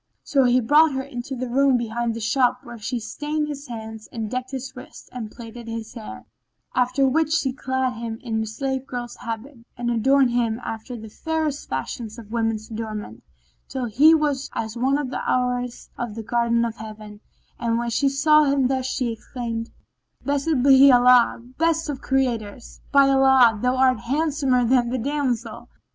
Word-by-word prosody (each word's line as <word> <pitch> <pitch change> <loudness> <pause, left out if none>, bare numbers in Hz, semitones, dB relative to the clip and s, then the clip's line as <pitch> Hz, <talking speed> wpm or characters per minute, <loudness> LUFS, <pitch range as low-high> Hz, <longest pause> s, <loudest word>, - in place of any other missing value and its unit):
So 270 -2 +2
he 245 +1 +4
brought 295 +5 +5
her 265 0 -2
into 265 -1 -6
the 255 0 -4
room 265 +1 +3
behind 235 0 -2
the - - -4
shop 245 +3 +1
where 235 -1 -10
she 240 +3 -3
stained 300 +6 -3
his 290 -1 -7
hands 220 -2 -8
and 220 -2 -4
decked 255 0 -3
his 265 0 -6
wrists 250 - -12
and 235 -4 -5
plaited 235 0 -10
his 225 -1 -6
hair, 225 -3 -9 0.5
after 255 +2 +2
which 310 +3 +1
she 275 -5 +1
clad 260 -1 -1
him 230 -1 -5
in 220 -3 -1
a 220 - -3
slave 265 +3 -3
girl's 245 -1 -5
habit 230 +4 -6 0.2
and 240 0 -1
adorned 260 +2 +3
him 235 -2 0
after 225 +3 -6
the 220 0 -9
fairest 310 +4 -3
fashion 130 - -4
of 220 -2 -11
woman's 225 -1 -2
adornment, 215 - -6 0.5
till 260 -2 -3
he 285 +9 +6
was 290 -3 0
as 220 0 -3
one 265 +4 +1
of 280 -3 -3
the - - -3
Houris 250 -1 -1
of 240 -3 -4
the 225 - -5
Garden 235 +1 +1
of 230 -1 -5
Heaven, 215 -1 -10 0.4
and 230 -1 0
when 235 0 -2
she 275 +4 +2
saw 305 +2 +4
him 275 -1 +2
thus 260 -1 -1
she 255 -3 -1
exclaimed, 230 0 -5 0.6
"Blessed 285 -1 +1
be 275 0 +8
Allah, 245 -1 +5 0.2
best 325 -1 +1
of 275 -2 -4
Creators! 240 -4 -2
By 280 -1 +6
Allah, 265 -5 +5
thou 250 +1 +2
art 255 -2 +3
handsomer 275 -1 +1
than 240 0 +3
the 255 - -1
damsel. 250 -3 -2
250 Hz, 180 wpm, -23 LUFS, 230-270 Hz, 0.6 s, be